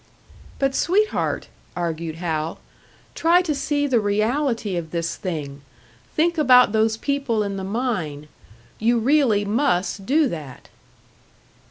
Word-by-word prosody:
"But, 275 -1 0
sweetheart!" 410 +9 0 0.3
argued 165 -2 -3
Hal. 160 -1 -3 0.6
"Try 345 +2 +3
to 320 -4 -1
see 290 +1 -1
the 260 -4 +2
reality 215 +1 0
of 170 -2 -4
this 170 0 -2
thing 145 -6 -5 0.5
think 335 +1 +2
about 250 -6 +6
those 220 0 +2
people 275 -5 -1
in 200 -1 -3
the 190 - -5
mine. 190 - -3 0.5
You 235 +2 +2
really 235 -4 +3
must 200 -4 0
do 295 +3 +3
that!" 150 -6 -8
220 Hz, 125 wpm, -22 LUFS, 175-280 Hz, 0.6 s, about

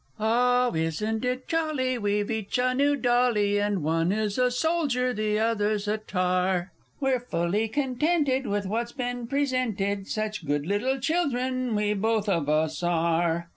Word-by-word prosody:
Oh, 245 +3 +2
isn't 165 +8 -1
it 255 +1 -2
jolly! 300 -6 0
we've 205 0 0
each 220 +1 -2
a 255 0 +2
new 285 +2 +2
dolly, 240 -6 +2
And 205 -4 0
one 165 +3 +1
is 210 +1 -1
a 250 0 +4
Soldier, 255 -3 0
the 215 -1 0
other's 215 -2 0
a 215 +1 0
Tar; 185 -2 0 0.3
We're 265 -2 +1
fully 210 -2 -1
contented 270 +2 0
with 205 0 -1
what's 235 +4 -2
been 245 -3 -4
presented, 230 -8 -1
Such 215 -3 -3
good 145 0 0
little 220 +9 0
children 255 -5 0
we 210 0 +1
both 215 +1 0
of 165 -7 0
us 155 +1 +1
are! 170 0 +1
220 Hz, 150 wpm, -26 LUFS, 195-255 Hz, 0.3 s, a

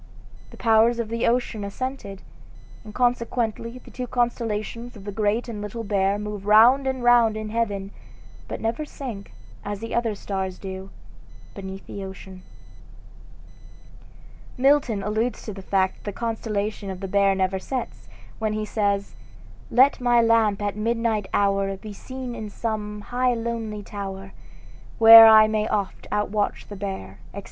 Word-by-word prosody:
The - - -14
powers 225 +1 +4
of 230 -2 -3
the 230 +1 -1
ocean 235 -3 0
assented, 200 -2 -5 0.6
and 215 - -10
consequently 235 -1 -1
the 250 - -15
two 250 0 -5
constellations 235 -1 -2
of 205 - -11
the 205 - -5
Great 215 +3 0
and 220 -3 -6
Little 210 +3 -5
Bear 200 -1 +1
move 210 -1 -6
round 240 +6 +6
and 260 -2 -2
round 240 -3 +5
in 215 0 -5
heaven, 205 -3 -2 0.6
but - - -5
never 230 +6 -2
sink, 245 -9 -8 0.3
as 205 -1 -4
the 230 +1 -6
other 230 -3 0
stars 190 -2 -4
do, 190 0 -7 0.6
beneath 195 -1 -8
the 200 - -7
ocean. 190 -1 -10 2.2
Milton 255 -6 +2
alludes 220 +4 -1
to 215 - -6
the 195 - -9
fact 190 0 0
that - - -21
the 205 - -4
constellation 215 -3 -3
of 190 -1 -6
the 195 - -5
Bear 200 0 +3
never 190 0 0
sets, 250 +5 -5 0.3
when 215 -1 -1
he 215 0 -2
says: 200 -2 -1 0.6
"Let 260 +3 +4
my 240 -1 +4
lamp 225 -3 +3
at 205 -1 -2
midnight 225 -2 -1
hour 195 -1 +1
Be 210 +2 -9
seen 255 +4 -7
in 220 -3 -6
some 210 -1 -4
high 245 +4 0
lonely 225 -2 -4
tower, 195 -1 -7 0.7
Where 225 0 +11
I 215 -1 +8
may 215 0 0
oft 200 -2 -3
outwatch 210 0 -1
the 205 - -7
Bear," 185 - -6 0.2
etc. - - -4
215 Hz, 155 wpm, -24 LUFS, 200-235 Hz, 2.2 s, Where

